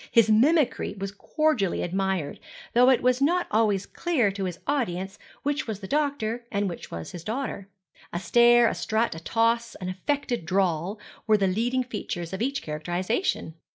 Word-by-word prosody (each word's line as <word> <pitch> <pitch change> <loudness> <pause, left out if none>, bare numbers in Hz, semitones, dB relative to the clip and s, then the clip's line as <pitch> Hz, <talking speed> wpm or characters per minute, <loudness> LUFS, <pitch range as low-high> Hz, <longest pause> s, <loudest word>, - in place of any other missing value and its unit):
His 225 -2 +5
mimicry 260 0 +3
was 195 0 -4
cordially 225 - 0
admired, 190 -4 -1 0.3
though 250 +2 +6
it 260 - +3
was 250 +1 +3
not 350 +5 +3
always 210 -3 +2
clear 275 - 0
to 195 0 -3
his 180 -2 -4
audience 195 -9 -2 0.2
which 290 -1 -1
was 215 -3 -4
the 190 - -8
doctor 275 -5 -1
and 200 -1 0
which 175 - -6
was 85 -1 -6
his 175 - -8
daughter. 215 -3 -4 0.4
A - - -3
stare, 240 +3 +5
a - - 0
strut, 225 +2 0
a 165 - -7
toss, 230 +6 +1
an 185 -1 -5
affected 240 - -2
drawl 185 +2 0 0.3
were 215 -1 +5
the 200 - +1
leading 235 +7 +1
features 190 -7 -5
of 190 - -4
each 275 +3 -1
characterization. 175 - -2
215 Hz, 170 wpm, -26 LUFS, 190-250 Hz, 0.4 s, though